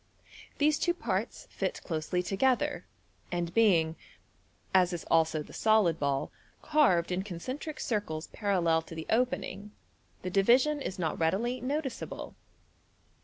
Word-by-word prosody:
These 300 +1 +3
two 345 - +1
parts 355 - -3
fit - - -2
closely 165 +2 -2
together, 265 +9 0 0.4
and 175 -1 -2
being 170 -8 +4 0.8
(as 180 -1 +4
is 170 - -4
also 160 -2 +3
the - - -14
solid 215 -7 +3
ball) 140 -1 0
q - - -36 0.3
_^^> - - -34
q - - -18
carved 185 - +4
in 180 +1 0
concentric 255 - -6
circles 200 - -2
parallel 175 -6 +2
to 165 - -11
the 160 0 -5
opening, 210 -4 -1 0.5
the 185 - -3
division 250 +10 +4
is 190 - -4
not 165 -3 -2
readily 215 +10 0
notice 275 +1 -2
able. - - -7
190 Hz, 145 wpm, -30 LUFS, 165-250 Hz, 0.8 s, being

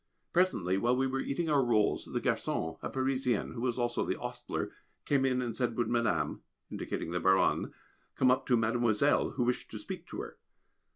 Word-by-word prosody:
Presently 100 - +2
while 120 +4 +2
we 130 +1 +1
were 135 0 -1
eating 160 +5 -2
our 145 -3 +3
rolls, 110 -4 +2
the - - -2
garçon, 80 0 -1
a - - -3
Parisian 130 -1 0
(who 115 - -6
was 125 -1 0
also 120 -1 0
the - - -2
ostler), - - -4 0.3
came 135 -2 +2
in 125 -1 +1
and 115 -2 -3
said: 120 -3 -1
Would 120 - +1
Madame 115 -2 0 0.3
indicating 80 - -4
the 90 - 0
Baronne 95 +1 +3 0.4
come 130 -1 +4
up 130 - +1
to 125 - +4
"Mademoiselle," 115 +3 +2
who 125 - 0
wished 125 +1 -1
to - - -6
speak - - -7
to - - -5
her? - - -9
125 Hz, 190 wpm, -31 LUFS, 115-130 Hz, 0.4 s, come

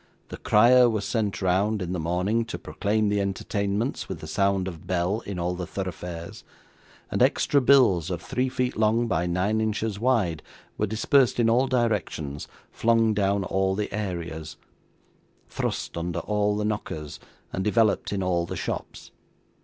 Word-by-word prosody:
The - - -7
crier 120 +3 +5
was 110 -3 -2
sent 105 -2 -1
round, 100 +4 +2
in 90 -1 -3
the 90 - -2
morning, 90 +8 0
to - - -5
proclaim 105 +1 -1
the 100 0 +1
entertainments 100 +4 -2
with 95 - -4
the - - -8
sound 95 +3 +1
of 85 -4 -8
bell 90 +4 0
in 100 -2 -4
all 90 +1 -1
the 90 -1 -5
thoroughfares; 90 -3 -6 0.7
and - - -1
extra 140 - +3
bills 120 - +4
of 90 -2 -2
three 125 +8 -1
feet 125 -1 -1
long 110 +2 +2
by 90 -6 0
nine 95 +5 0
inches 110 -1 -2
wide, 105 -10 +1 0.3
were 105 - -1
dispersed 120 +5 +2
in 115 -1 +4
all 125 +3 +3
directions, 105 - -1 0.2
flung 115 -1 +2
down 100 -1 +1
all 95 +1 0
the 105 0 -3
areas, 85 -6 -4 0.9
thrust - - -3
under 85 0 -3
all 105 0 0
the 105 - -1
knockers, 80 -8 -4 0.3
and 95 - -2
developed 110 +1 +2
in 100 -2 -1
all 85 -2 0
the - - -5
shops. - - -5
100 Hz, 160 wpm, -25 LUFS, 90-110 Hz, 0.9 s, crier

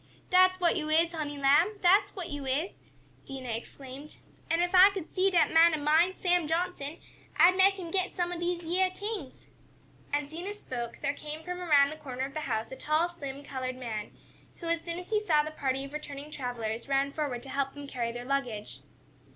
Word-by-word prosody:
"Dat's 370 0 +5
what 345 -2 +3
yo' 305 -2 -2
is, 330 +2 +3
honey 295 -3 -4
lamb! 295 +9 +4
Dat's 380 +3 +4
what 355 -5 -5
yo' 290 -1 -4
is!" 285 +8 -1 0.5
Dinah 265 -3 -6
exclaimed. 265 +5 -7 0.3
"An' 330 - +2
ef 350 +1 +1
I 375 +2 +9
could 385 -5 -7
see 380 +1 +3
dat 355 -3 +3
man 325 0 +6
ob 300 - -5
mine, 320 +5 +3
Sam 355 -3 +1
Johnson, 325 -2 -2 0.4
I'd 345 +4 +7
make 390 +1 +5
him 350 -4 -7
take 375 0 0
some 350 -1 -1
ob 345 - -5
dese 345 0 -2
yeah 365 +3 +2
t'ings." 400 -7 -6 0.7
As 290 0 -1
Dinah 360 +6 -5
spoke 240 - -6
there 285 -1 +1
came 300 +2 -8
from 360 +1 -5
around 290 -4 +5
the 310 - -7
corner 265 -3 -4
of 275 - -8
the 310 - -3
house 230 -6 -2
a - - -5
tall, 310 +5 +1
slim 285 -5 -7
colored 255 -2 -4
man, 225 -5 -5 0.5
who 340 - -10
as 335 0 0
soon 335 0 -5
as 360 +3 -9
he 430 - +3
saw 315 -8 +3
the 305 - -5
party 270 -3 -1
of 275 - -11
returning 295 -1 -7
travelers, 235 -3 -4
ran 275 0 +2
forward 280 -5 -3
to 270 - -9
help 275 0 -2
them 285 0 -8
carry 240 -4 -3
their 240 +1 -7
luggage. 245 -6 -2
305 Hz, 210 wpm, -29 LUFS, 275-350 Hz, 0.7 s, I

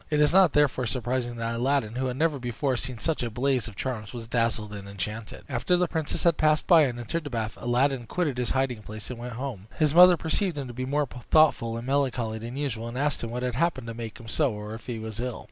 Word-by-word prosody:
It 150 - +1
is 150 +1 +4
not 185 -5 +6
therefore 135 -4 +2
surprising 120 0 -2
that 115 0 -2
Aladdin, 120 -2 0
who 130 +2 -1
had 125 0 -3
never 155 -2 +1
before 125 +2 -1
seen 125 0 -2
such 155 +8 -1
a 120 - -1
blaze 125 +1 0
of 105 - -9
charms, 110 -3 -4
was 120 -2 -6
dazzled 115 -2 0
and 100 -1 -8
enchanted. 105 +3 -5
After 125 +10 +1
the 180 - +3
princess 160 -2 -2
had 170 -3 +4
passed 155 -1 +3
by, 165 -4 +7
and 120 -3 -3
entered 120 +8 -3
the 145 - -5
bath, 115 -3 -3
Aladdin 125 0 +1
quitted 150 -8 -1
his 125 - 0
hiding 130 -4 0
place 110 +2 -8
and 120 - -7
went 120 0 -6
home. 115 -5 -5
His 150 -3 +2
mother 180 +1 +8
perceived 165 +1 0
him 140 -2 -3
to 120 - -8
be 130 +2 -3
more 145 +2 +1
thoughtful 125 -2 +2
and 115 - -6
melancholy 125 -5 0
than 120 +4 -6
usual, 115 -6 -2
and 120 +2 -6
asked 145 -1 0
what 120 +2 -3
had 125 -1 -1
happened 140 -2 0
to 115 - -5
make 115 -2 -7
him 115 - -11
so, 140 +3 +1
or 105 +1 -6
if 115 - -10
he 120 -2 -3
was 110 -1 -6
ill. 125 -1 -3
125 Hz, 250 wpm, -27 LUFS, 115-145 Hz, -, mother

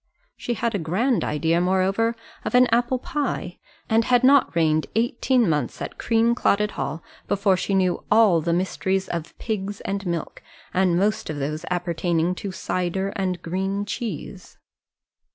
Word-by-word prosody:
She 240 - -3
had 230 +1 -1
a 200 - -1
grand 205 +10 +1
idea, 160 +3 +1
moreover, 190 +5 +1 0.3
of - - -2
an 250 0 +7
apple 240 +2 +2
pie, 250 -10 -3 0.3
and 225 +1 +3
had 245 -1 +3
not 270 -7 +5
reigned 155 -2 +2
eighteen 240 +1 +2
months 150 -3 -1
at - - -6
Creamclotted 225 -2 +2
Hall 155 +4 -4 0.2
before 200 -1 +2
she 195 +2 -1
knew 185 -2 +1
all 210 -7 +5
the 170 - -1
mysteries 190 +2 0
of 170 -2 -5
pigs 205 -2 -3
and 200 0 -3
milk, 170 -1 -4 0.3
and 185 -2 +2
most 205 +3 0
of 155 - -3
those 150 +2 -3
appertaining 175 -1 0
to 195 +1 -5
cider 185 +1 -2
and 185 -3 -3
green 195 +4 -2
geese. 205 -3 -6
190 Hz, 150 wpm, -23 LUFS, 175-225 Hz, 0.3 s, an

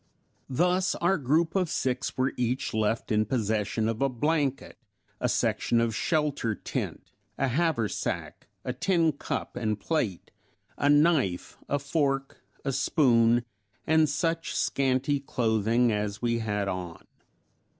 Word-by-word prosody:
Thus 180 +7 +1
our 175 +2 +1
group 155 +5 +1
of 185 -4 +1
six 130 -2 -2
were 130 +1 +1
each 125 +1 -1
left 110 +1 0
in 110 0 +3
possession 110 -1 -1
of 115 +1 -2
a 140 - +3
blanket, 140 +1 -1 0.4
a - - 0
section 120 - +1
of 115 -1 +1
shelter 150 -5 0
tent, - - -5 0.3
a 135 - +1
haversack, 140 -5 -1 0.2
a 125 - -2
tin 165 +3 +2
cup 145 - -5
and 110 -3 -1
plate, 120 - -2 0.4
a 145 - +1
knife, 145 - +2
a 145 - +2
fork, 140 -1 -1 0.2
a 135 - +1
spoon, 120 -4 +3 0.4
and 160 -1 +4
such 165 +3 -1
scanty 135 +1 +1
clothing 115 -2 +1
as 105 -1 -2
we 115 -1 0
had 105 -3 -1
on. 90 -3 -5
130 Hz, 130 wpm, -27 LUFS, 115-150 Hz, 0.4 s, and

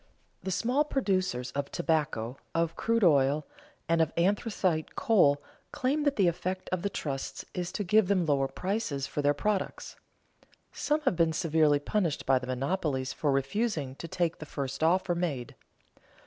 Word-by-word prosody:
The - - -4
small 245 - +2
producers 185 - -1
of 140 0 -3
tobacco, 150 -8 -1 0.2
of 165 0 +1
crude 230 -1 +1
oil, 145 -2 +4 0.4
and 165 0 +3
of 160 -1 +2
anthracite 185 -3 0
coal 145 -11 +3 0.3
claim 285 +4 0
that 285 -1 +2
the 195 -4 +3
effect 185 +2 -2
of 185 -2 -1
the 200 - -1
trusts 140 -7 -4
is 180 0 -3
to 205 - -2
give 210 +2 +4
them 185 -3 +2
lower 140 -3 +2
prices 170 -2 -2
for 145 - -3
their 145 0 +3
products. 205 +4 -2 0.8
Some 300 +1 0
have 265 -11 +1
been 165 -1 +2
severely 155 -3 +3
punished 165 +2 -1
by 130 -1 +4
the 125 - -8
monopolies 135 0 -1
for 145 - 0
refusing 140 - -1
to 170 - -6
take 175 -2 -1
the 155 - -8
first 140 -1 -4
offer 175 +2 +3
made. 160 -8 -3
165 Hz, 160 wpm, -29 LUFS, 145-195 Hz, 0.8 s, oil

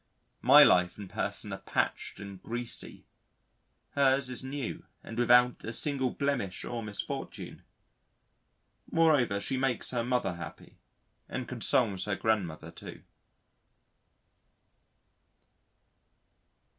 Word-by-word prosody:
My - - +9
life 90 -1 +4
and 100 -2 -7
person - - -3
are - - -5
patched - - -2
and 100 -2 -9
greasy; 120 +1 -4 0.9
hers 135 -2 +3
is 125 - -3
new 135 -2 -5 0.2
and 115 - -8
without 120 +1 +4
a 115 - -4
single 135 0 0
blemish 140 -9 -2
or 120 -1 -4
misfortune.... 105 -2 -6 1.3
Moreover, 145 -11 +3
she 130 +6 -2
makes 130 -2 -1
her 120 -2 0
mother 120 -8 0
happy 85 - -10 0.5
and 125 -1 -4
consoles 115 -4 +1
her 105 -1 -1
grandmother 90 -8 -1
too. - - -11
120 Hz, 105 wpm, -30 LUFS, 100-130 Hz, 1.3 s, My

